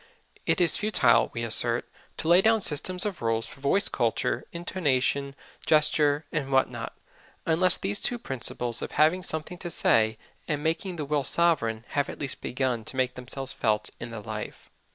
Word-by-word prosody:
It - - +1
is 175 -2 +2
futile, 210 - +2
we 115 - -5
assert, 115 +1 +9 0.3
to - - -6
lay 175 +2 +5
down 220 +1 +2
systems 180 +4 0
of 200 -5 -5
rules 115 -1 -1
for 135 - -13
voice 145 +9 +1
culture, 115 -3 -2
intonation, 140 -5 -2 0.3
gesture, 150 -1 +2
and 140 -4 -4
what 135 0 +1
not, - - -8 0.5
unless 175 +3 +3
these 200 +1 -2
two 245 - -2
principles 125 - -4
of - - -7
having 160 +5 +2
something 170 0 -5
to 175 - -6
say 110 -8 +1 0.3
and 150 -2 -3
making 165 +3 -2
the 155 -3 -5
will 145 0 -1
sovereign 130 -7 +1
have 145 -1 -2
at - - -8
least 140 -2 -7
begun 125 -3 -3
to - - -9
make 130 -1 -1
themselves 130 +1 -8
felt 105 -2 -2
in 120 - -7
the 115 -2 -8
life. 105 0 -9
145 Hz, 175 wpm, -25 LUFS, 120-170 Hz, 0.5 s, assert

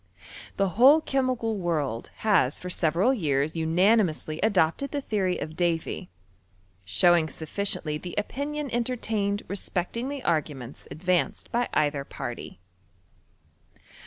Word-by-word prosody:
The 195 -1 +2
whole 260 - +6
chemical 255 -7 -1
world 150 - -2 0.2
has 175 -10 +3
for 180 - -7
severid 180 - +2
years 145 -1 0
unanimously 165 -1 +2
adopted 205 +5 +2
the 290 - -2
theory 195 -8 -1
of 155 +1 -6
Davy; 165 - -1 0.7
showing 160 - +4
sufficiently 160 -2 -2
the 175 +1 -7
opinion 280 +5 -3
entertained 225 -4 -1
lespecting 200 +5 -2
the 285 -2 -5
arguments 145 -6 -2
advanced 180 +2 -1
by 240 +1 0
either 145 -2 +1
party. - - -7
180 Hz, 110 wpm, -26 LUFS, 155-230 Hz, 0.7 s, whole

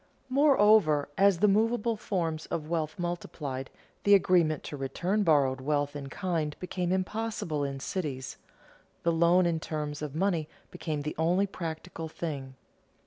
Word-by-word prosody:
Moreover, 215 - +4
as 200 -2 +4
the 210 - +6
movable 225 +2 +2
forms 170 -7 -2
of 155 -2 -3
wealth 160 -2 -2
multiplied, 150 -6 -4 0.3
the 205 0 +7
agreement 170 -5 +3
to - - -6
return 175 +9 -1
borrowed 140 -7 +3
wealth 145 +1 0
in 140 -1 -6
kind 165 -4 -2
became 180 -1 -2
impossible 190 -5 -2
in 135 -1 -3
cities; 135 -5 -4 0.7
the 170 - +3
loan 170 +2 +4
in 170 -2 +1
terms 150 -2 -4
of 150 -1 -5
money 170 -3 0 0.2
became 150 -2 -3
the 150 - -3
only 175 +5 +3
practicable 165 -3 -6
thing. 140 -5 -5
165 Hz, 140 wpm, -29 LUFS, 150-190 Hz, 0.7 s, the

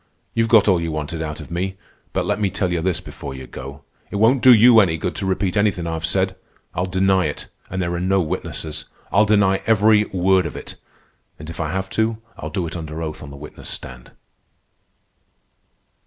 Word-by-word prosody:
You've 115 0 +2
got 110 -3 +6
all 90 -4 +4
you 85 -1 -2
wanted 75 +1 -4
out 75 -1 -4
of - - -10
me. 95 +3 -2 0.3
But - - -1
let - - 0
me 100 - +2
tell 95 -1 -1
you 85 -2 0
this 90 -1 0
before 65 - -8
you 65 0 -8
go. 70 +2 -9 0.3
It - - -7
won't 115 +5 +4
do 130 - +8
you 115 0 +8
any 85 -6 +3
good 90 +3 -2
to 95 - -2
repeat 95 0 0
anything 100 -4 +1
I've 80 -1 -2
said. 95 +2 0 0.4
I'll 90 +2 -1
deny 95 -1 +2
it, 75 - -6 0.2
and 95 - -4
there 85 -1 -1
are 85 - -2
no 95 +2 +2
witnesses. 80 -2 -4 0.3
I'll 105 +2 +5
deny 100 -2 +3
every 110 -1 +5
word 95 -2 +2
of - - -8
it; - - -8 0.6
and 80 +2 -8
if - - -10
I 80 -2 -1
have 95 +1 -2
to, 110 0 +1 0.2
I'll - - -6
do 95 -3 -2
it 80 - -6
under 80 -2 -6
oath 80 -1 -5
on 75 - -8
the 70 - -10
witness 75 +2 -9
stand." - - -8
95 Hz, 210 wpm, -21 LUFS, 80-100 Hz, 0.6 s, do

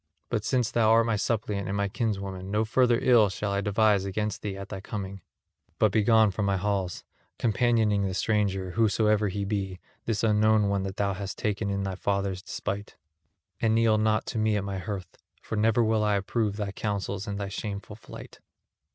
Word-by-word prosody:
But 110 -3 -1
since 125 -2 +1
thou 115 -2 +3
art 115 0 +5
my 115 -2 +1
suppliant 105 -2 -1
and 100 +1 -2
my 100 0 +1
kinswoman, 95 -3 -3
no 105 +2 +1
further 120 +1 +3
ill 115 -5 +5
shall 100 +1 -3
I 100 0 0
devise 105 -1 +3
against 105 +1 -3
thee 100 -2 -4
at 100 +1 -8
thy 95 -2 -6
coming; 100 -2 -6 0.6
but 110 - +3
begone 110 0 +4
from 100 +2 -2
my 100 -1 +1
halls, 95 -2 -2 0.3
companioning 110 -3 +2
the 95 - -3
stranger, 95 -3 0
whosoever 105 0 +2
he 100 +1 -3
be, 95 -2 -3 0.3
this 110 -2 -1
unknown 110 -1 +3
one 100 -1 +1
that 95 0 -5
thou 100 -1 +1
hast 95 0 -5
taken 105 -1 -1
in 100 0 -1
thy 95 -1 -2
father's 100 0 -1
despite; 100 +1 -5 0.7
and 110 0 +3
kneel 115 -1 +3
not 110 0 +1
to 110 - -3
me 110 -1 +2
at 100 - -2
my 100 -1 -4
hearth, 95 -2 -6 0.2
for - - -5
never 110 +2 +3
will 110 -1 +2
I 105 -1 +2
approve 100 +1 -1
thy 105 -2 -3
counsels 100 0 -3
and 100 -1 -3
thy 100 -1 -3
shameful 100 0 -5
flight." 110 - -12
105 Hz, 195 wpm, -27 LUFS, 100-110 Hz, 0.7 s, art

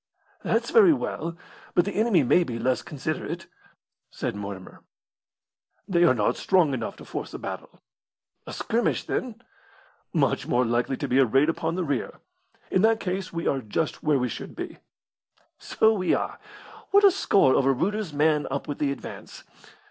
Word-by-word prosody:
"That's - - 0
very 415 -8 +7
well; 170 - -4 0.4
but 175 - +4
the 200 - -2
enemy 210 -7 +3
may 175 +8 +4
be 120 -8 -5
less 130 +2 0
considerate," 155 +2 -5 0.6
said - - -4
Mortimer. 100 -2 -8 1.1
"They 175 -3 +3
are 145 - +4
not 105 -3 +1
strong 180 -7 +2
enough 130 - -3
to - - -13
force - - -6
a - - -3
battle." - - -8 0.6
"A - - -6
skirmish, 235 +2 -1
then?" 240 -1 -4 0.7
"Much - - 0
more 125 +1 +2
likely 120 +3 0
to - - -3
be 130 - +2
a 135 - +6
raid 135 +6 +3
upon 165 0 -1
the 185 - -1
rear. 140 -6 -2 0.6
In 185 - +3
that 220 +1 +4
case 185 -1 -3
we 170 0 -4
are 135 - 0
just 130 +8 -2
where 150 -2 +2
we 125 -1 0
should 115 - -7
be." - - -7 0.8
"So 220 0 +2
we 185 -4 +1
are! - - -4 0.5
What 405 +1 +5
a 400 - +8
score 195 - +3
over 135 0 +3
Reuter's 195 +7 -1
man 150 0 +2
up 140 +1 -4
with 145 - -5
the 145 -2 +1
advance! 140 - -9
155 Hz, 170 wpm, -25 LUFS, 130-195 Hz, 1.1 s, a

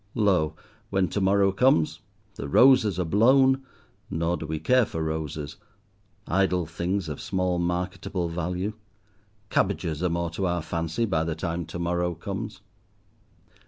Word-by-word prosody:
Lo, 90 -8 +2 0.3
when 95 -2 +1
to 100 - -2
morrow 95 0 +3
comes, 135 +8 +2 0.3
the 70 - -6
roses 120 - +5
are 90 - 0
blown; 130 +8 +4 0.5
nor 85 +2 0
do 80 - -6
we 80 +1 -2
care 125 +11 +3
for 80 -6 -3
roses, 80 -2 -4 0.7
idle 90 -1 +1
things 85 +3 -2
of 75 -2 -5
small 90 -2 -1
marketable 90 +1 -2
value; 90 +4 -3 0.8
cabbages 85 -5 0
are 90 - +1
more 85 0 -1
to 95 +3 -1
our 85 -2 -1
fancy 85 +6 -1
by 80 -7 0
the 80 -1 -2
time 85 0 -3
to 80 - -6
morrow 85 0 -1
comes. 100 +5 -6
90 Hz, 145 wpm, -26 LUFS, 80-100 Hz, 0.8 s, roses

